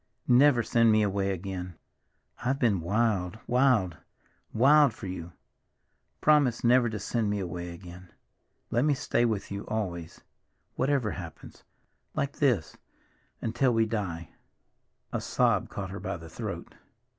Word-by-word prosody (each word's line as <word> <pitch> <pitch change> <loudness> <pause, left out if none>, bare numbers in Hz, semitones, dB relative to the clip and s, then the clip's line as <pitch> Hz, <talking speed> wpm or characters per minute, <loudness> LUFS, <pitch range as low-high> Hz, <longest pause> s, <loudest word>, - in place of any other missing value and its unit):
"Never 125 -1 +5
send 115 0 +3
me 110 0 +4
away 100 -1 0
again. 90 -1 -5 0.7
I've 130 +2 +1
been 110 -9 +2
wild, 100 0 0
wild, 120 -9 +2 0.5
wild 140 +2 +5
for - - -9
you! 90 -2 -6 0.9
Promise 145 -6 +3
never 120 0 +4
to 110 - -4
send 110 +1 -1
me 105 0 -1
away 90 -1 -5
again. 90 +1 -11 0.6
Let 120 +3 +2
me 150 -1 +3
stay 120 -2 +1
with 110 -4 -2
you 100 0 -4
always—whatever 110 - -4
happens—like 135 - -8
this—until 120 - -2
we 115 0 +3
die!" 95 -8 -4 0.8
A - - -1
sob - - +1
caught - - -5
her - - -6
by - - -4
the 80 0 -11
throat. - - -6
110 Hz, 125 wpm, -28 LUFS, 90-125 Hz, 0.9 s, Never